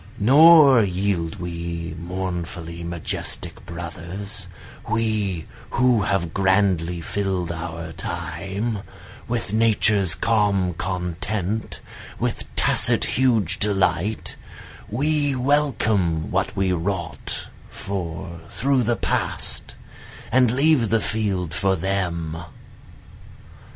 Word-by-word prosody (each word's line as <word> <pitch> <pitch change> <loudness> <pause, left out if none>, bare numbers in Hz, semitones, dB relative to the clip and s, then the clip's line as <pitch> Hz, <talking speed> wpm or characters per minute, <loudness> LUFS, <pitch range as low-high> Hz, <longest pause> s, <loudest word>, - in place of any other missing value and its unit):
Nor 140 +2 +7
yield 95 -4 -1
we 85 -1 -5
mournfully 85 -1 -5
majestic 85 -1 -3
brothers, 85 +3 -7 0.4
We 105 -6 0 0.2
who 125 -3 +3
have 95 -4 -1
grandly 95 -3 +2
fill'd 95 -2 -2
our 85 -1 -5
time, 100 +6 -4 0.5
With 115 -3 -2
Nature's 105 -4 +3
calm 100 -5 +1
content, 90 +4 -3 0.4
with - - -2
tacit - - +5
huge 110 -7 +1
delight, 100 -1 0 0.5
We 145 +4 +1
welcome 110 - +1
what - - 0
we 95 -1 +1
wrought 85 -1 -3 0.2
for 85 -3 -5
through 135 -1 +1
the 120 0 +1
past, - - -1 0.6
And 125 -1 +5
leave 135 -2 +3
the 115 +2 +3
field 95 -6 -1
for 95 +2 +1
them. 85 -3 -2
95 Hz, 90 wpm, -23 LUFS, 85-110 Hz, 0.6 s, Nor